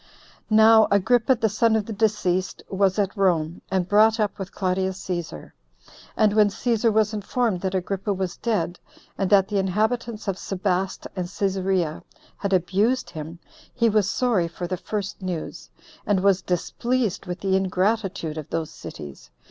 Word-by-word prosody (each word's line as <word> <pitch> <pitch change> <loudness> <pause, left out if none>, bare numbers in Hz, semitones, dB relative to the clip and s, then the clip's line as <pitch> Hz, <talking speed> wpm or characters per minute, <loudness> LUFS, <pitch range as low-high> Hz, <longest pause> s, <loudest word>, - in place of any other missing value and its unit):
2. 215 - +2
Now 220 0 +7
Agrippa, 235 +5 +3
the 225 -1 +1
son 220 +2 +2
of 215 -2 0
the 225 - -5
deceased, 195 -4 0
was 190 0 +2
at 200 -1 0
Rome, 175 -5 +1
and 185 -2 0
brought 215 +3 +4
up 210 -2 -1
with 195 -1 -5
Claudius 190 0 -1
Cæsar. 175 - -5 0.7
And 215 -1 +4
when 210 -1 +5
Cæsar 230 +1 +1
was 215 0 +2
informed 215 -2 -1
that 190 0 -2
Agrippa 195 +2 -2
was 190 -2 -2
dead, 180 -7 -2 0.4
and 195 -2 -1
that 195 -2 +5
the 205 -2 0
inhabitants 215 +4 -1
of 195 -1 -2
Sebaste 190 -1 -2
and 180 -2 -3
Cæsarea 190 -4 -1 0.4
had 200 - -3
abused 195 +7 +1
him, 160 +1 -7 0.4
he 235 -2 +3
was 205 -2 +2
sorry 225 -9 +1
for 175 +1 -6
the 185 +1 -2
first 200 +2 -5
news, 180 -4 -5 0.3
and 200 -3 +1
was 195 -1 +4
displeased 225 +4 -1
with 180 +1 -4
the 190 -1 +1
ingratitude 190 -3 0
of 150 - -9
those 165 -2 -3
cities. 70 -4 -10
195 Hz, 165 wpm, -24 LUFS, 180-215 Hz, 0.7 s, Now